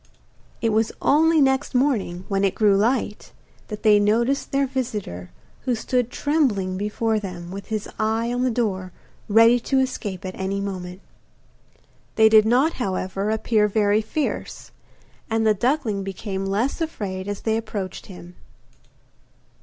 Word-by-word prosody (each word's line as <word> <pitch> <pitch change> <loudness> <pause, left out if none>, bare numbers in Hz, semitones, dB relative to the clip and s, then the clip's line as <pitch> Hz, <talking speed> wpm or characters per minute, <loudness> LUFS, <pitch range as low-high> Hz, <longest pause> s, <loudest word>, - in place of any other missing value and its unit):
It 225 - +3
was 220 +1 +1
only 320 +2 +4
next 265 0 +1
morning, 215 -9 0
when 195 -1 0
it 195 - +1
grew 210 -2 +4
light, 220 +1 0 0.4
that 210 -1 -7
they 210 -2 +6
noticed 235 +6 +1
their 275 0 +2
visitor, 210 - -4 0.4
who 250 -2 +1
stood 245 +1 -1
trembling 250 -11 0
before 215 +2 -1
them, 180 -3 -7
with 195 +1 -7
his 215 -2 -3
eye 225 +2 0
on 245 - -1
the 255 - +2
door 195 -6 -2 0.4
ready 230 +3 +6
to 270 +3 -1
escape 215 -8 -2
at 185 - -4
any 190 +1 -3
moment. 185 -2 -5 1.1
They 220 0 +6
did 220 0 +6
not, 260 +8 +3
however, 195 0 -2
appear 220 -1 +2
very 210 0 +2
fierce, 250 +8 -4 0.6
and 225 0 +1
the 215 - +5
duckling 235 -3 0
became 195 0 -4
less 225 - -1
afraid 195 -12 -4
as 205 -1 -4
they 220 -1 0
approached 215 -4 -5
him. 180 -2 -11
215 Hz, 145 wpm, -23 LUFS, 195-245 Hz, 1.1 s, they